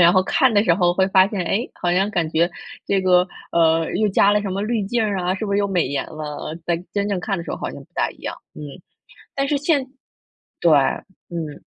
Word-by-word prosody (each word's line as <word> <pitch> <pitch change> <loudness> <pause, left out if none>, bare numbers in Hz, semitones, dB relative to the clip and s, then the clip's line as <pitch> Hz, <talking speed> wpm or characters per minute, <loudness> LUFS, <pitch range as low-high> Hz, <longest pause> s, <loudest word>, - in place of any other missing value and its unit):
然 175 0 +7
后 185 - +4
看 255 +6 +2
的 205 +1 +3
时 170 - +4
候 175 -1 +2
会 190 +1 +2
发 190 0 +5
现， 205 -4 -3
诶， 200 +8 -1
好 175 - +1
像 195 +3 +1
感 175 -6 0
觉 170 +2 +1 0.3
这 195 - +1
个， 180 -1 +4 0.3
呃， 165 -1 +3
又 210 +2 +2
加 200 +1 +4
了 210 0 +2
什 200 - -3
么 190 +1 -2
滤 220 +1 -1
镜 225 +4 0
儿 205 -2 0
啊， 180 +1 0
是 215 - -4
不 200 - -2
是 200 - +2
又 200 - +1
美 180 -6 +1
颜 140 +1 -2
了， 150 -2 -7
呃， 160 +2 -6
但 170 0 -1
真 200 0 -1
正 195 -3 -1
看 195 0 -2
的 170 - -6
时 - - -7
候 - - -3
好 - - -4
像 - - -9
不 - - -21
大 - - 0
一 - - -16
样， - - -6 0.2
嗯， 150 - -7 0.7
但 275 0 -1
是 290 - +1
现 285 -2 +1 0.7
对， 170 - +4 0.6
嗯。 160 -4 -6
190 Hz, 270 characters per minute, -21 LUFS, 170-205 Hz, 0.7 s, 然